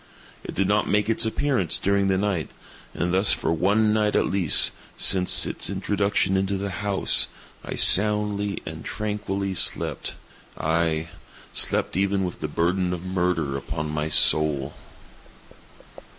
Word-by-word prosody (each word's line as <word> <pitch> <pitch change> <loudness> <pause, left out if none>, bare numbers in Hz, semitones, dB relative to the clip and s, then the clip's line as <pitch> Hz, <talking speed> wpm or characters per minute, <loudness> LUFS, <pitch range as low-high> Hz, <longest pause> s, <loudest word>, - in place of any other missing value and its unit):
It - - -8
did 95 - 0
not 105 +1 0
make 105 +2 +1
its 115 - 0
appearance 110 - -1
during 100 0 0
the 95 -1 +1
night; 95 -5 -2 0.5
and 90 +1 -2
thus 95 +2 +5
for 80 - -2
one 105 +6 +1
night 105 -1 0
at - - +2
least, 90 -5 +3 0.3
since 90 -1 +3
its - - -3
introduction 100 -1 -1
into 95 +1 -1
the 100 0 -5
house, 100 +2 +2 0.4
I - - -6
soundly 105 0 +3
and - - -8
tranquilly 100 -2 -4
slept; 90 - +1 0.4
aye, 80 0 -1 0.4
slept - - 0
even 100 +1 0
with 90 -2 -5
the - - -4
burden 90 +4 -1
of 90 +1 -10
murder 90 -6 -2
upon 75 +2 -5
my 75 0 -3
soul! 75 -3 +4
95 Hz, 140 wpm, -23 LUFS, 85-100 Hz, 0.5 s, thus